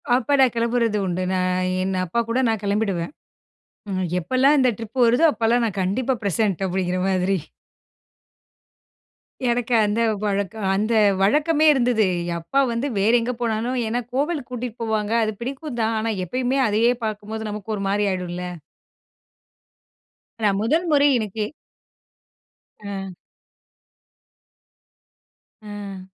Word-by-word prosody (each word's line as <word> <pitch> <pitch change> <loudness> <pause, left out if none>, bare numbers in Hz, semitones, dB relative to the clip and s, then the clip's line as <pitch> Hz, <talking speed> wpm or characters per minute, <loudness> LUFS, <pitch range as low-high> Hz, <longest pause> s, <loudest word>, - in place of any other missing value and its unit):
அப்ப 260 +3 +1
நான் 260 -3 +5
கிளம்புறது 230 -2 +1
உண்டு. 185 0 -2
நான் 185 0 0 0.2
என் 190 +1 -1
அப்பாகூட 230 +6 -1
நான் 220 -2 -1
கிளம்பிடுவேன். 200 -3 -1 0.8
ம் 185 -1 -1
எப்பலாம் 260 - +3
இந்த 255 - +4
ட்ரிப் 230 +3 -6
வருதோ! 245 +7 +4
அப்பலாம் 230 +2 +2
நான் 200 -3 -3
கண்டிப்பா 235 +8 0
பிரசன்ட் 200 -1 0
அப்பிடிங்கிற 185 0 -1
மாதிரி. 190 +1 +1 2.1
எனக்கு 240 0 0
அந்த 210 +3 0 0.2
பழக்கம் 200 +1 -2
அந்த 215 +4 0 0.3
வழக்கமே 300 +9 +3
இருந்தது. 240 -4 +2 0.3
அப்பா 220 +12 -1
வந்து 235 +5 -1
வேற 205 +3 +3
எங்க 245 +2 -2
போனாலும் 235 +2 -1
ஏன்னா 240 +2 -1
கோவிலுக்கு 285 0 -1
கூட்டிட்டு 245 -1 -5
போவாங்க. 220 -1 -1
அது 215 - -1
பிடிக்கும் 265 +1 -5
தான். 220 0 +1
ஆனா 225 +1 -1
எப்பயுமே 255 +7 -1
அதையே 220 +3 +3
பார்க்கும்போது 215 +1 -4
நமக்கு 210 +1 -5
ஒரு 195 - -4
மாதிரி 205 +1 +1
ஆயிடும்ல. 180 -1 -4 1.9
நான் 205 -2 +2
முதல்முறை 300 +2 +3
எனக்கு 215 -1 -3 1.4
ஆ. 195 -2 -6 2.5
ஆ. 205 -3 -8
220 Hz, 115 wpm, -22 LUFS, 195-245 Hz, 2.5 s, நான்